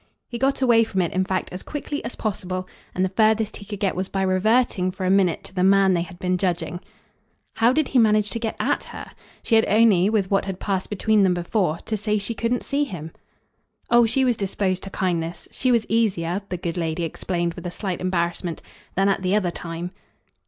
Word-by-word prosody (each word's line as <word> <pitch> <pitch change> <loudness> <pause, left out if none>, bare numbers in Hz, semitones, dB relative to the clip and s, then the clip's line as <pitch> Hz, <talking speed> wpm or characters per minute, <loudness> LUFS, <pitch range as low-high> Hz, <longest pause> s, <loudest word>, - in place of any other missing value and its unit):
He 235 - -6
got 270 +1 +1
away 235 -2 +5
from 195 -4 -2
it 170 - -2
in 185 - +2
fact 185 -1 -2
as 180 - -6
quickly 295 0 -5
as - - -5
possible, 185 -3 -3 0.3
and 185 - +2
the - - -1
furthest 220 +2 +2
he 205 - -11
could 205 -1 -6
get 195 -2 0
was 185 +1 -3
by 195 -1 -1
reverting 190 +1 +2
for 185 0 -5
a 185 - +2
minute 190 -4 +2
to - - -12
the 180 -1 0
man 195 0 +5
they 175 - +1
had 175 +1 -8
been 180 0 -1
judging. 175 -2 -1 0.8
"How 230 +2 +5
did 305 +1 +1
he 260 - +3
manage 210 -2 +3
to 230 - -2
get 225 -1 -3
AT - - 0
her? - - -9 0.3
She - - -2
had 225 0 +6
only 210 -3 +4
with 205 -3 0
what 195 - +2
had 190 -2 -5
passed 190 -2 -2
between 215 +1 +2
them 185 -2 +3
before 175 -1 0
to 220 - -1
say 210 0 0
she 205 +3 -3
couldn't 235 +2 -1
see 285 +1 0
him." 165 - -6 0.8
"Oh 240 -1 +6
she 265 +4 +2
was 245 -2 +2
disposed 195 -2 -1
to - - -6
kindness. 175 -3 -2
She 255 - 0
was 235 -2 +2
easier," 195 -5 0
the 180 - -2
good 170 0 -4
lady 165 0 -1
explained 170 +1 -2
with 175 +1 -7
a - - -2
slight 185 0 -4
embarrassment, 170 -2 -2 0.3
"than 195 +1 +3
at 195 -1 +1
the 185 +2 +1
other 185 -5 +1
time." 170 +1 -6
195 Hz, 225 wpm, -23 LUFS, 180-220 Hz, 0.8 s, had